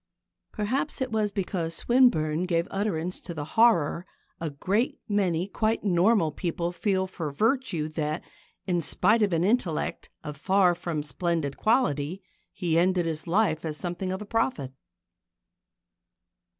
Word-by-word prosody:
Perhaps 255 Hz, +8 st, -2 dB
it 260 Hz, -2 st, -2 dB
was 215 Hz, -1 st, +1 dB
because 180 Hz, -4 st, -2 dB
Swinburne 180 Hz, -10 st, +3 dB
gave 170 Hz, 0 st, +1 dB
utterance 185 Hz, -3 st, -2 dB
to 170 Hz, -, -8 dB
the 145 Hz, -2 st, -4 dB
horror 190 Hz, -6 st, +3 dB, 0.3 s
a 165 Hz, -, -2 dB
great 195 Hz, -, -1 dB
many 190 Hz, -4 st, +1 dB
quite 220 Hz, +2 st, -1 dB
normal 185 Hz, -2 st, +3 dB
people 170 Hz, +2 st, -2 dB
feel 190 Hz, +1 st, 0 dB
for 170 Hz, -4 st, -5 dB
virtue 215 Hz, -, 0 dB
that, 155 Hz, +1 st, -3 dB, 0.4 s
in 175 Hz, -3 st, 0 dB
spite 220 Hz, +8 st, +3 dB
of 205 Hz, -2 st, +2 dB
an 165 Hz, 0 st, +1 dB
intellect 195 Hz, -6 st, 0 dB
of 150 Hz, -1 st, -6 dB
far 185 Hz, +3 st, +3 dB
from 170 Hz, -3 st, -3 dB
splendid 150 Hz, 0 st, -2 dB
quality, 190 Hz, -, +1 dB, 0.3 s
he 165 Hz, -2 st, 0 dB
ended 180 Hz, 0 st, +2 dB
his 160 Hz, 0 st, -3 dB
life 175 Hz, -3 st, +1 dB
as 155 Hz, -2 st, -4 dB
something 180 Hz, +2 st, -3 dB
of 190 Hz, +3 st, -4 dB
a -, -, -11 dB
prophet. 205 Hz, -, -1 dB
180 Hz, 140 wpm, -27 LUFS, 160-210 Hz, 0.4 s, Swinburne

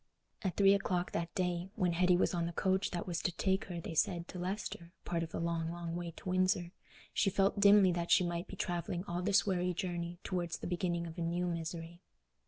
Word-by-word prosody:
At 190 Hz, -4 st, -2 dB
three 195 Hz, -1 st, +7 dB
o'clock 180 Hz, -3 st, 0 dB
that 170 Hz, 0 st, -2 dB
day, 180 Hz, 0 st, -1 dB
when 185 Hz, -5 st, +1 dB
Hetty 180 Hz, +1 st, +4 dB
was -, -, +2 dB
on 170 Hz, -1 st, 0 dB
the -, -, -3 dB
coach 190 Hz, +3 st, +1 dB
that 175 Hz, -, -3 dB
was 175 Hz, -2 st, -2 dB
to 180 Hz, -, 0 dB
take 190 Hz, +3 st, 0 dB
her, 175 Hz, -2 st, -5 dB
they 165 Hz, -, -6 dB
said, 170 Hz, +2 st, +1 dB
to 180 Hz, -, -7 dB
Leicester—part 175 Hz, -2 st, -4 dB
of 165 Hz, -, -3 dB
the -, -, -3 dB
long, 165 Hz, -1 st, -1 dB
long 170 Hz, -1 st, -4 dB
way 175 Hz, 0 st, -3 dB
to -, -, -10 dB
Windsor—she 185 Hz, +2 st, -1 dB
felt 195 Hz, +2 st, +2 dB
dimly 200 Hz, -2 st, +7 dB
that 170 Hz, 0 st, -2 dB
she -, -, +6 dB
might 175 Hz, +1 st, -3 dB
be -, -, -8 dB
travelling 175 Hz, -1 st, -2 dB
all 175 Hz, -2 st, -3 dB
this 200 Hz, +2 st, +3 dB
weary 180 Hz, -2 st, 0 dB
journey 175 Hz, -1 st, -3 dB
towards 175 Hz, -3 st, -2 dB
the -, -, -8 dB
beginning 175 Hz, -1 st, -1 dB
of 165 Hz, +1 st, -7 dB
new 170 Hz, +1 st, 0 dB
misery. 170 Hz, 0 st, -4 dB
175 Hz, 210 wpm, -34 LUFS, 170-185 Hz, -, three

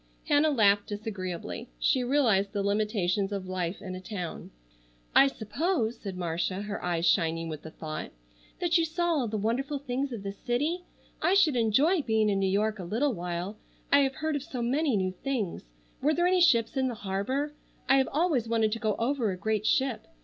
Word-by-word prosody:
Hannah 295 Hz, +2 st, +4 dB
laughed 205 Hz, -7 st, +3 dB
disagreeably. 205 Hz, +1 st, -5 dB
She 255 Hz, -, +2 dB
realized 230 Hz, -7 st, +2 dB
the 200 Hz, -1 st, -1 dB
limitations 200 Hz, -2 st, 0 dB
of 195 Hz, -2 st, -3 dB
life 185 Hz, -1 st, -3 dB
in 185 Hz, -, -5 dB
a 185 Hz, -, -6 dB
town. 185 Hz, -4 st, -6 dB, 0.6 s
"I 275 Hz, -, +7 dB
suppose," 240 Hz, -, -1 dB
said 195 Hz, -3 st, -6 dB
Marcia, 175 Hz, +3 st, -2 dB
her 205 Hz, -1 st, -5 dB
eyes 170 Hz, -1 st, 0 dB
shining 165 Hz, -2 st, +2 dB
with 155 Hz, -2 st, -6 dB
the 160 Hz, -, -9 dB
thought, 155 Hz, -1 st, -6 dB, 0.5 s
"that 345 Hz, -1 st, +3 dB
you -, -, +3 dB
saw 345 Hz, +2 st, -1 dB
all 280 Hz, -7 st, +1 dB
the 215 Hz, 0 st, -2 dB
wonderful 255 Hz, +8 st, -1 dB
things 270 Hz, 0 st, -3 dB
of 225 Hz, -5 st, -6 dB
the 200 Hz, -, -3 dB
city. 290 Hz, -, -2 dB, 0.4 s
I 370 Hz, -, +3 dB
should 330 Hz, -8 st, +4 dB
enjoy 265 Hz, -, +3 dB
being 220 Hz, -4 st, +2 dB
in 195 Hz, -1 st, +1 dB
New 195 Hz, -1 st, +1 dB
York 210 Hz, +2 st, 0 dB
a -, -, -4 dB
little 235 Hz, +10 st, 0 dB
while. 175 Hz, +2 st, -4 dB, 0.3 s
I 280 Hz, -, +7 dB
have 270 Hz, -1 st, +1 dB
heard 315 Hz, -1 st, -1 dB
of 285 Hz, -, -1 dB
so 265 Hz, -5 st, -5 dB
many 270 Hz, 0 st, +1 dB
new 185 Hz, -1 st, 0 dB
things. 205 Hz, -, -3 dB, 0.3 s
Were 300 Hz, +3 st, +2 dB
there 345 Hz, -, +2 dB
any 365 Hz, 0 st, +3 dB
ships 235 Hz, -9 st, +4 dB
in 265 Hz, -1 st, +1 dB
the 245 Hz, -, -3 dB
harbor? 215 Hz, +9 st, -2 dB, 0.3 s
I 270 Hz, -, +5 dB
have 265 Hz, -, +2 dB
always 295 Hz, -7 st, +1 dB
wanted 225 Hz, -2 st, +2 dB
to 230 Hz, -, -2 dB
go 215 Hz, -3 st, 0 dB
over 240 Hz, -1 st, 0 dB
a 185 Hz, -, -3 dB
great 215 Hz, +2 st, -1 dB
ship. 265 Hz, -3 st, +1 dB
220 Hz, 200 wpm, -28 LUFS, 195-275 Hz, 0.6 s, I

